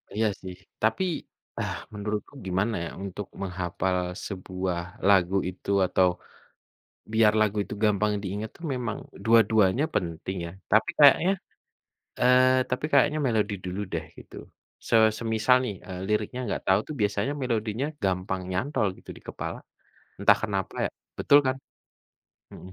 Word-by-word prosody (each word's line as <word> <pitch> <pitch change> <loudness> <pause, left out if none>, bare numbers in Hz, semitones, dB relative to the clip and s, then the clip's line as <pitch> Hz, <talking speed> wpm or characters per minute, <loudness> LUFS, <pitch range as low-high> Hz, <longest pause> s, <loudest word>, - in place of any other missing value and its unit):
Iya, 110 +1 +2
sih. 95 -1 -7 0.3
Tapi, 110 +11 +2 0.6
ah, - - -2 0.2
menurutku 105 +3 -4
gimana 95 +5 0
ya, - - -5
untuk 100 0 -6
menghafal 90 0 -2 0.3
sebuah 90 -2 -3 0.3
lagu 95 -1 +4
itu, 95 +1 -10 0.2
atau 90 0 +3 1.1
biar 110 -1 +5
lagu 105 -1 +2
itu - - -7
gampang 105 0 +2
diingat 105 +3 -4
tuh 170 - -13
memang 120 -3 -3 0.3
dua-duanya 110 +1 +4
penting 85 +1 -2
ya, - - -7 0.2
tapi 110 +1 +4
kayaknya, 150 +5 +7 0.9
eee, 130 +1 +5
tapi 125 +4 -1
kayaknya 150 +1 +4
melodi 110 -3 +1
dulu 90 +2 -4
deh, 80 -1 -3
gitu. - - -14 0.5
Se - - +3 0.2
semisal 115 +2 +2
nih, 105 - -3
eee, 90 -1 -6
liriknya 105 +4 -1
nggak - - -2
tahu 95 +1 +5
tuh 155 - -5
biasanya 105 +6 0
melodinya 115 0 -1 0.2
gampang 95 0 -1
nyantol 115 +3 0
gitu - - -16
di - - -15
kepala. - - -5 0.6
Entah - - +5
kenapa 100 -4 -2
ya, - - -1 0.3
betul 145 - +6
kan? 130 0 +1 1.0
Mhm. 95 - -11
105 Hz, 140 wpm, -27 LUFS, 95-115 Hz, 1.1 s, kayaknya